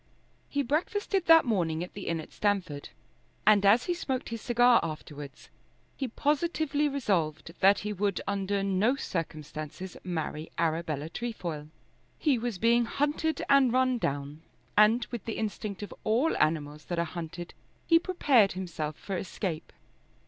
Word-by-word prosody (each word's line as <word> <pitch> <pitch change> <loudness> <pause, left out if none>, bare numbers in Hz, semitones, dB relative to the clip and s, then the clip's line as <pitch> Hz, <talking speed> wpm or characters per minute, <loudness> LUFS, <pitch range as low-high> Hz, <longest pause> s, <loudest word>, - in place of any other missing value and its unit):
He 285 0 0
breakfasted 360 - 0
that 325 -2 +8
morning 175 -8 0
at 180 - -9
the 200 - -7
inn 165 -1 0
at 155 - -9
Stamford, 185 -9 -1 0.6
and 205 -1 +6
as 210 +5 +6
he 355 - 0
smoked 265 -7 -3
his 230 -1 -5
cigar 245 -1 +5
afterwards, 150 -3 -7 0.5
he 270 - -2
positively 295 +2 0
resolved 170 - -1
that 195 +1 +6
he 210 0 -3
would 200 -1 0
under 200 0 -1
no 200 +6 +2
circumstances 155 - -5
marry 160 -3 -4
Arabella 160 -2 -1
Trefoil. 170 -7 -5 0.5
He 280 -6 +2
was 235 -3 -3
being 235 +4 +3
hunted 295 +4 -1
and 275 -3 +5
run 255 0 +2
down, 145 -2 -3 0.3
and, 220 +3 +5
with 240 -3 -5
the 225 - -3
instinct 210 -1 -4
of 205 - -7
all 240 +9 +2
animals 150 -1 0
that 175 - -3
are 170 - +1
hunted, 170 +1 -7 0.3
he 330 -1 +6
prepared 285 - +3
himself 160 -5 -4
for 195 - -5
escape. 180 -2 -4
200 Hz, 150 wpm, -29 LUFS, 165-250 Hz, 0.6 s, that